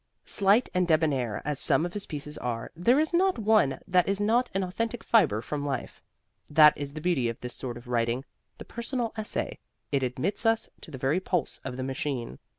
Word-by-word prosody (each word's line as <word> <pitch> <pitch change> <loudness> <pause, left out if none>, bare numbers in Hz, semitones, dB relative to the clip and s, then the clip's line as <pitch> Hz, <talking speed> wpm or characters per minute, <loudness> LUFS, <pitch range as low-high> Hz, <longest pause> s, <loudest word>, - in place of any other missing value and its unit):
Slight 200 +5 +3
and 180 -1 +2
debonair 145 -9 +1
as 145 -1 -1
some 150 +2 +2
of 175 - -5
his 205 -1 -4
pieces 150 0 -6
are, 115 -2 -4
there 235 - +3
is 315 +2 0
not 375 +2 +3
one 210 - +3
that 180 0 +3
is 200 0 0
not 235 +4 +2
an 195 - +1
authentic 230 +6 -3
fiber 155 - +3
from 145 +4 -3
life. 135 -4 -4 0.5
That 150 0 +7
is 140 -1 -6
the 155 - -6
beauty 150 -9 +1
of 115 - -6
this 125 0 -5
sort 120 -2 -5
of 120 +1 -13
writing 120 +2 0 0.3
the - - -9
personal 235 -1 -3
essay 215 -1 -3 0.3
it 140 -2 +2
admits 130 - -2
us 225 -1 +2
to - - -11
the 140 - -7
very 135 +7 +1
pulse 180 -5 -1
of 125 -2 -5
the 130 - -3
machine. 130 - -3
155 Hz, 205 wpm, -28 LUFS, 130-205 Hz, 0.5 s, That